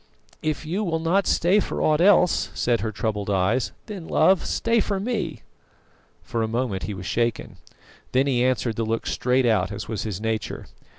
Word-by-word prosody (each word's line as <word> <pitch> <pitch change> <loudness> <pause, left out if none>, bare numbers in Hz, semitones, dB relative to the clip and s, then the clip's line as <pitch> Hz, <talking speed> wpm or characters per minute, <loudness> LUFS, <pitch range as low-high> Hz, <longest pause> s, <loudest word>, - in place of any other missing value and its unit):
"If 155 +1 -2
you 185 +7 -1
will 165 -4 0
not 170 +5 +1
stay 180 +5 +3
for - - -3
aught 155 +1 +2
else," 180 -2 +4
said 120 -1 +1
her 110 - -2
troubled 105 -1 -3
eyes, 100 +6 +1
"then, 195 -6 -7
love, 190 -2 +3
stay 230 0 +1
for 200 -2 -1
me." 200 -8 -3 0.8
For 115 - -3
a 110 - 0
moment 115 -4 -2
he 105 - -4
was 90 -1 -8
shaken. 115 0 -1 0.5
Then 130 +2 +3
he 125 -3 +1
answered 125 -3 0
the 115 - 0
look 115 +1 -2
straight 125 +1 +1
out, 105 -5 +2
as 100 - -6
was 110 -3 -3
his 105 -4 -4
nature. 110 -2 -3
125 Hz, 185 wpm, -24 LUFS, 110-170 Hz, 0.8 s, else